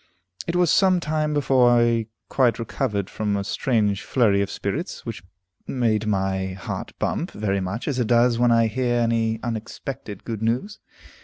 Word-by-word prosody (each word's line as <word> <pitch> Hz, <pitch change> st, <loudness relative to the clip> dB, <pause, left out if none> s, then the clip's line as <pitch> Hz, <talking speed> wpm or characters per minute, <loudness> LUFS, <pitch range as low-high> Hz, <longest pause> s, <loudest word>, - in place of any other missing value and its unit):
It 170 Hz, -, -1 dB
was 175 Hz, -3 st, +3 dB
some 190 Hz, -2 st, +4 dB
time 155 Hz, -2 st, -1 dB
before 135 Hz, -4 st, +4 dB
I 120 Hz, -2 st, +3 dB, 0.2 s
quite 125 Hz, -4 st, +2 dB
recovered 110 Hz, -4 st, -2 dB
from 105 Hz, -1 st, -2 dB
a 100 Hz, -, -2 dB
strange 105 Hz, -2 st, 0 dB
flurry 105 Hz, -6 st, +2 dB
of 100 Hz, -, -1 dB
spirits, 140 Hz, -, -4 dB
which 115 Hz, -7 st, -5 dB, 0.5 s
made 110 Hz, -4 st, 0 dB
my 95 Hz, -2 st, 0 dB
heart 95 Hz, -, -6 dB
bump -, -, -1 dB
very 100 Hz, -2 st, -1 dB
much 95 Hz, +6 st, -4 dB
as 135 Hz, -4 st, -1 dB
it 120 Hz, -, +1 dB
does 120 Hz, 0 st, +3 dB
when 120 Hz, -1 st, +4 dB
I 115 Hz, 0 st, +4 dB
hear 120 Hz, +2 st, 0 dB
any 115 Hz, -1 st, +1 dB
unexpected 115 Hz, -1 st, -5 dB
good 110 Hz, -2 st, -5 dB
news. 125 Hz, -, -1 dB
115 Hz, 165 wpm, -23 LUFS, 105-130 Hz, 0.5 s, some